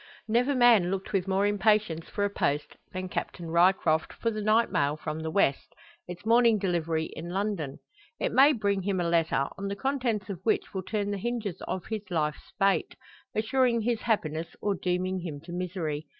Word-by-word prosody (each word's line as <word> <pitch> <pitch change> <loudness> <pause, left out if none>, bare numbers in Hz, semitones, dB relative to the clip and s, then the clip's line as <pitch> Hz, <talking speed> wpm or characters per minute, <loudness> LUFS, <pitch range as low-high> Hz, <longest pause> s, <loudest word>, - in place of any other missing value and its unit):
Never 245 +5 +2
man 235 -8 +5
looked 195 +2 -4
with 195 -1 +1
more 195 +1 +2
impatience 205 -5 +1
for 205 - -2
a - - 0
post, 145 -6 -1 0.2
than 185 0 -4
Captain 170 -2 -5
Ryecroft 170 -2 +3
for 230 - -1
the 215 -1 -4
night 215 +2 +3
mail 145 +2 +1
from 155 0 -4
the 160 0 -3
West, 160 -6 +1 0.3
its 180 +3 -8
morning 230 -1 +5
delivery 165 -4 -1
in 170 +2 -6
London. 185 -7 -2 0.4
It - - 0
may 270 +4 +7
bring 200 -4 0
him 190 0 -1
a 175 - 0
letter, 165 -5 +2
on 200 - -3
the 200 - -3
contents 245 -5 -1
of 195 -4 -5
which 220 - 0
will 190 - -2
turn 205 +2 -2
the 200 - -3
hinges 230 -4 -3
of 185 - -3
his 220 -2 -3
life's 150 -4 -2
fate, 195 -1 +2 0.4
assuring 235 +1 +2
his 230 0 0
happiness 165 -8 -1
or 205 - 0
dooming 185 0 -1
him 165 -5 -6
to 170 +2 -11
misery. 175 -4 -3
195 Hz, 190 wpm, -28 LUFS, 170-215 Hz, 0.4 s, may